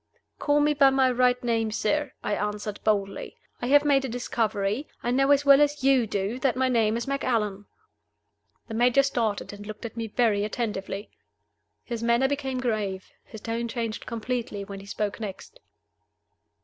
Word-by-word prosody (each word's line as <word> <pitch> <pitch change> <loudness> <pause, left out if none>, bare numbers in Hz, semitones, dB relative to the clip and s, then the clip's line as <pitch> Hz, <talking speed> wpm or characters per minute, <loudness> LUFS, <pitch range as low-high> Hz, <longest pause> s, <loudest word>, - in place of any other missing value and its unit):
"Call 290 0 +2
me 300 0 +3
by 280 -2 +6
my 265 -1 +3
right 250 0 +2
name, 225 -2 +1
sir," 260 +6 -1
I - - -1
answered, 210 0 -3
boldly. 200 -2 -1 0.2
"I 245 - -2
have 290 +2 +5
made 275 -2 +4
a 265 - -3
discovery. 225 0 -1 0.2
I 240 - 0
know 270 +2 +2
as 285 0 +4
well 280 0 +7
as 290 -1 +1
you 265 -4 +4
do 205 +4 -2
that 260 -1 +1
my 260 0 +2
name 225 -2 +2
is 235 - -3
Macallan." 215 -7 -1 1.0
The 225 - -7
Major 245 +4 +4
started, 230 -7 -1
and 205 0 -10
looked 215 +1 -8
at 230 - -7
me 230 -1 -3
very 215 -2 +1
attentively. 210 -2 -4 0.7
His 235 -2 -5
manner 235 +3 +3
became 270 -2 -2
grave, 210 -6 -2
his 220 - -11
tone 230 +1 -2
changed 230 -2 -4
completely, 230 -3 -3
when 200 0 -8
he 195 - -12
spoke 205 +1 -3
next. 210 - -8
235 Hz, 175 wpm, -26 LUFS, 210-265 Hz, 1.0 s, well